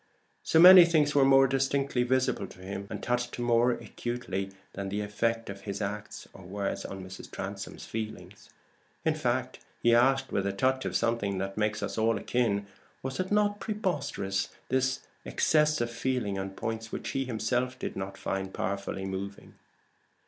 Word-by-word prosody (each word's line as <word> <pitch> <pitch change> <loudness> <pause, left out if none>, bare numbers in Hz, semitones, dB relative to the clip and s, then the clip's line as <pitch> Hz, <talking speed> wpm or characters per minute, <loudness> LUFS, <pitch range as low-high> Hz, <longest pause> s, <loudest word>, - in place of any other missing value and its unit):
So - - +1
many 180 +1 +11
things 155 -3 +3
were 140 - +5
more 135 0 +7
distinctly 135 0 +1
visible 125 -4 +1
to - - -15
him, 95 +1 -6
and - - -6
touched 120 0 -1
him 120 - -3
more 120 +1 +4
acutely, 120 -5 -3 0.2
than 100 0 -4
the 105 +2 -2
effect 115 +2 -1
of 100 0 -7
his 100 0 -5
acts 105 0 -5
or - - -12
words 100 +2 -3
on 95 -1 -6
Mrs. 95 0 -9
Transome's - - -6
feelings! 110 -1 -7 0.6
In - - +3
fact - - -1 0.2
he 120 - +5
asked, 135 +3 +3
with 100 0 0
a 100 - -1
touch 130 +6 +1
of - - -3
something 115 -4 0
that 95 +1 -3
makes 105 0 0
us 105 - -3
all 110 0 +3
akin 100 -2 0 0.4
was 130 0 -4
it 185 +1 -2
not 205 0 +2
preposterous, 145 - -2 0.2
this 130 0 +1 0.2
excess 150 - +2
of 120 0 -1
feeling 120 -4 -1
on 95 0 -3
points 110 +3 -5
which - - -4
he 135 0 -1
himself 125 +2 -1
did - - -5
not 95 0 -5
find 95 0 -3
powerfully 100 0 -3
moving? 95 +1 -6
115 Hz, 170 wpm, -29 LUFS, 100-130 Hz, 0.6 s, many